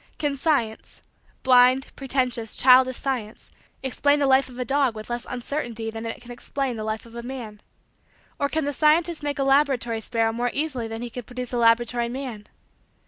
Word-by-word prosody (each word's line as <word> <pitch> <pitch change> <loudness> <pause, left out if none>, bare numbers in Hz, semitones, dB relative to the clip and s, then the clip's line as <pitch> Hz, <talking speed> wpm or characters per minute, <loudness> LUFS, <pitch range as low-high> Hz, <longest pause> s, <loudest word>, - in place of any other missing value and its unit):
Can 290 -2 -1
science 270 -7 -1 0.4
blind, 255 +1 +4
pretentious, 255 -4 -1
childish 255 0 +6
science 240 -5 -4 0.3
explain 285 +2 +2
the 285 - +1
life 265 0 +4
of 250 - -12
a 250 - -2
dog 270 -3 +1
with 215 +2 -8
less 240 0 -3
uncertainty 240 -3 -4
than 225 +1 -6
it 225 - -5
can 245 - -11
explain 260 +1 -3
the 215 - -5
life 215 +1 -3
of 230 - -15
a 235 - -6
man? 235 -4 -7 0.8
Or 280 - +1
can 315 -1 -1
the 290 - -2
scientist 320 +3 +2
make 290 -1 -3
a 275 - +1
laboratory 270 -5 +2
sparrow 225 0 0
more 240 +2 -1
easily 280 -6 -1
than 225 +1 -6
he 240 - -6
can 250 - -6
produce 250 +1 -7
a - - 0
laboratory 235 0 +3
man? 245 -5 -6
250 Hz, 190 wpm, -24 LUFS, 230-275 Hz, 0.8 s, childish